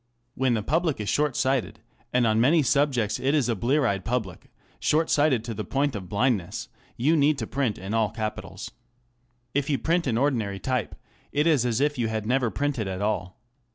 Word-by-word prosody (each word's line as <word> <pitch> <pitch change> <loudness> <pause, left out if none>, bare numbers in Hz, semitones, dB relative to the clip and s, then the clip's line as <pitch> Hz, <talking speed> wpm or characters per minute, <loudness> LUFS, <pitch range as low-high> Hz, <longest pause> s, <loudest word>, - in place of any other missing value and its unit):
When 130 -2 +1
the 110 - -2
public 160 - 0
is 105 - -3
short 150 -3 +1
sighted 130 -3 0
ŌĆö - - -31
and 125 -1 +3
on 110 0 +3
many 150 +5 +4
subjects 130 -5 +1
it 140 +3 +1
is 140 -6 +2
a 120 - 0
blear 135 +8 +1
eyed 100 -5 0
public/ 110 -5 -3 0.3
short 160 +2 +1
sighted 145 -6 +3
to 115 0 -4
the 105 0 -4
point 135 +5 -1
of 100 -3 -5
blindnessŌĆö 110 0 -1 0.3
you 145 +7 +3
need 150 -1 +3
to 115 - -3
print 130 -4 -1
in 95 +3 -7 0.2
capitals. 110 -2 -5 0.8
If 145 0 0
you 140 - +2
print 170 +1 0
in 115 -3 +1
ordinary 115 -7 0
type, 125 +2 -2 0.4
it 150 +1 +1
is 145 -7 +3
as 115 -1 0
if 145 -1 +1
you 115 - +1
had 110 -1 -3
never 125 +1 +1
printed 135 -5 -2
at 95 +1 -3
all. 95 -4 -2
125 Hz, 200 wpm, -26 LUFS, 110-145 Hz, 0.8 s, many